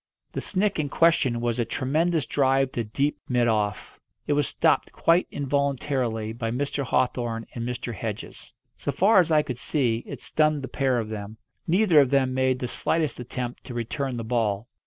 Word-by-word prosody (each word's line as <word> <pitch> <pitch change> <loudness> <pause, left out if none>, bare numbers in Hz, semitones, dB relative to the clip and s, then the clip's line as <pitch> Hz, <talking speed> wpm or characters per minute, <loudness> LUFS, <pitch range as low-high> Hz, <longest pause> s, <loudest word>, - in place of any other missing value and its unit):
The - - -4
"snick" 200 -1 0
in 145 -2 -1
question 140 -8 +3
was 120 0 -1
a - - +3
tremendous 155 +4 0
drive 135 0 +2
to 120 - -2
deep 140 +7 -1
mid 120 -2 +2
off. 105 -2 -1 0.3
It 145 - +1
was 145 0 +1
stopped, - - +1
quite 170 +2 +2
involuntarily, 135 -5 -1
by 115 0 -3
Mr. 140 +4 -2
Hawthorn 120 -2 0
and 115 - -4
Mr. 125 -1 -4
Hedges. 100 - -6 0.2
So - - -3
far 200 +2 +5
as 170 -2 +2
I 155 -1 +4
could 125 -4 -5
see, 120 -7 0
it - - -7
stunned 155 -2 +1
the - - -3
pair 130 -3 0
of 110 -2 -2
them. 105 0 -6 0.3
Neither 180 -2 +5
of 140 -3 +4
them 135 -1 +2
made 130 0 +2
the 125 - -3
slightest 155 +2 -1
attempt 125 0 -5
to 125 - -7
return 125 +2 -3
the 115 - -3
ball. 110 -2 -1
130 Hz, 185 wpm, -25 LUFS, 120-145 Hz, 0.3 s, far